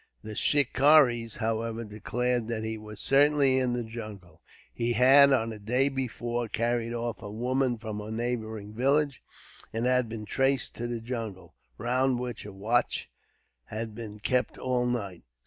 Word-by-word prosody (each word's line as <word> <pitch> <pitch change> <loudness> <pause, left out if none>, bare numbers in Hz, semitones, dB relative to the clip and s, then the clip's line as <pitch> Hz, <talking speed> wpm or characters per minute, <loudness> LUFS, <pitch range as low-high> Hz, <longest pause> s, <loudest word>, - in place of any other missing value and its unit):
The 110 0 -7
shikaris, 135 -3 +4
however, 115 0 -2
declared 120 +2 -2
that 115 -2 -3
he 110 0 -3
was 105 -1 -10
certainly 140 -1 +4
in 125 -1 0
the 120 0 -1
jungle. 110 -5 -9 0.3
He 120 0 -1
had, 135 +4 +7
on 115 -4 +2
the 110 - -8
day 125 +6 +2
before, 120 -3 -3
carried 115 +1 -1
off 120 -1 -3
a 105 - -7
woman 125 +3 0
from 110 -2 -5
a 105 - -7
neighbouring 110 -2 -3
village; 140 +3 +1 0.5
and 115 +2 -2
had 125 -2 +2
been 110 -1 -6
traced 135 +3 +1
to 120 - -3
the 120 -1 -4
jungle, 115 -5 -6 0.2
round 125 +3 +1
which 120 -4 -5
a - - -8
watch 110 +6 0 0.5
had 110 0 -5
been 105 -2 -8
kept 125 +4 0
all 125 -1 0
night. 100 -8 -3
120 Hz, 160 wpm, -28 LUFS, 110-125 Hz, 0.5 s, had